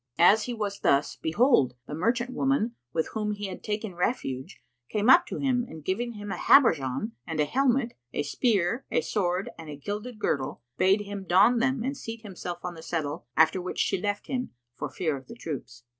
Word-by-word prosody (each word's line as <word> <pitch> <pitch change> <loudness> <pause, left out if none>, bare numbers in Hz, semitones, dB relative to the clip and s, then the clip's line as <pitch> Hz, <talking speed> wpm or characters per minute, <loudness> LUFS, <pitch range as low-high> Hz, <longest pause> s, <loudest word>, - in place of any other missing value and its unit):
As 195 +6 +6
he 245 - -3
was 205 -2 -3
thus, 140 +1 +2
behold, 160 - +3
the 145 - -7
merchant 235 +9 0
woman 265 -3 +1 0.2
with 160 - -1
whom 210 -1 -2
he 205 0 -5
had 190 -2 -7
taken 210 -2 -3
refuge 135 - -2 0.3
came 215 +4 +4
up 350 +5 +7
to - - -4
him 255 -3 +1
and 160 -2 -10
giving 235 +5 -1
him 205 -2 -7
a - - -3
habergeon 165 - +4 0.2
and 160 -1 -3
a 150 - +4
helmet, 255 - +1 0.2
a - - -1
spear, 205 - +1
a - - +2
sword 190 +2 -1
and 160 -1 -8
a 150 - -6
gilded 210 - -5
girdle, 135 - -2
bade 190 +7 +3
him 200 -1 -6
don 200 +7 +5
them 260 0 +1
and 270 +3 -2
seat 230 -3 -7
himself 180 -4 -6
on 180 - -4
the 165 - -10
settle 155 -5 -3
after 160 +4 +4
which 180 - -5
she 180 - +1
left 205 0 -2
him, 255 -1 -2 0.3
for - - -4
fear 160 -5 -1
of 135 -1 -10
the - - -9
troops. 135 - -7
205 Hz, 205 wpm, -27 LUFS, 160-235 Hz, 0.3 s, up